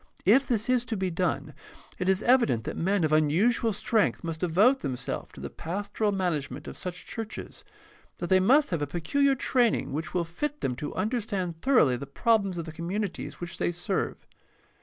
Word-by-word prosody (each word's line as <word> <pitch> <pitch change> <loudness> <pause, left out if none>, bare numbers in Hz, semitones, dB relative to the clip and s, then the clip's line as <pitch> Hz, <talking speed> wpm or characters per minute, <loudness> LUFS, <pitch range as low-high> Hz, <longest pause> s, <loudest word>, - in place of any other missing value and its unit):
If 250 +8 +5
this 225 -2 0
is 250 -1 +2
to 225 -2 -3
be 190 -1 -1
done, 180 +2 -1 0.5
it 180 0 0
is 190 +2 +2
evident 235 - +3
that - - -4
men 195 +1 +1
of 155 - +1
unusual 180 +10 +3
strength 210 0 +1
must 165 -1 -4
devote 200 +11 +4
themselves 125 - -4
to - - -11
the - - -6
pas 200 +5 -5
toral 210 0 0
management 155 -7 -2
of - - -7
such 180 -1 -6
churches, 225 -1 -7
and - - -29 0.4
that 175 - -4
they 190 - +6
must 265 +9 +4
have 170 -4 -1
a 145 - -1
peculiar 270 - +1
training 245 - +1
which 155 +1 -3
will 175 -1 +1
fit 295 - -4
them 125 - -1
to 145 - -5
understand 195 -5 -2
thor 275 0 +2
oughly 125 - +4
the 140 - -7
problems 200 - +1
of 165 - -3
the 160 - -7
communities 180 +5 -4
which 175 0 -6
they - - +1
serve. 175 +3 -2
185 Hz, 200 wpm, -27 LUFS, 165-225 Hz, 0.5 s, they